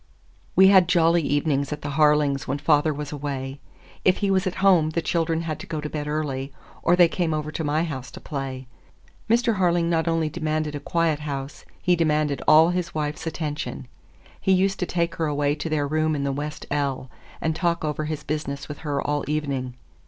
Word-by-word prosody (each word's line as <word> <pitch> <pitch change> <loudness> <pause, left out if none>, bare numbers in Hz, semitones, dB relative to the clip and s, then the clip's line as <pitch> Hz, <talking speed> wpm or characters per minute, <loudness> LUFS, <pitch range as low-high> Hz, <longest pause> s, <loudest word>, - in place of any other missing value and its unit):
We 190 0 +8
had 190 -3 +6
jolly 170 0 +4
evenings 145 -1 0
at 150 0 -5
the 145 - -3
Harlings 150 -2 +3
when 135 +1 -1
the 145 - -15
father 150 +1 +3
was 150 -1 -5
away. 140 -2 -4 0.4
If 185 - +4
he 200 -2 0
was 190 0 +2
at 185 - -2
home, 175 -5 +5
the 160 - -1
children 165 -1 0
had 160 -3 -4
to - - -9
go 155 - -3
to 150 0 -5
bed 150 -1 -4
early, 145 -3 -2 0.3
or 175 - +4
they 175 -1 +6
came 165 -2 -1
over 155 0 -3
to 160 - -3
my 150 +2 +1
house 135 -6 -5
to - - -8
play. 135 -2 -5 0.6
Mr. 230 -1 +3
Harling 175 -2 +2
not 165 0 +1
only 165 -1 +1
demanded 155 -1 -2
a 145 - -4
quiet 165 -1 0
house, 140 -1 -6 0.2
he 180 - +4
demanded 150 -3 +1
all 160 +2 +7
his 180 -2 -2
wife's 150 +1 -3
attention. 150 -4 -4 0.5
He 190 - +3
used 190 +1 +2
to 180 - -1
take 170 -1 0
her 160 - 0
away 145 -1 +1
to 150 +2 -4
their 150 -2 0
room 155 +1 +1
in 140 - -2
the 140 - 0
west 150 +2 -5
ell, 140 -3 -2 0.3
and 160 -1 -1
talk 170 -1 0
over 150 0 -2
his 150 -1 -4
business 140 -2 -4
with 150 - -7
her 145 -3 -2
all 145 +1 -1
evening. 140 -4 -2
155 Hz, 210 wpm, -24 LUFS, 145-165 Hz, 0.6 s, We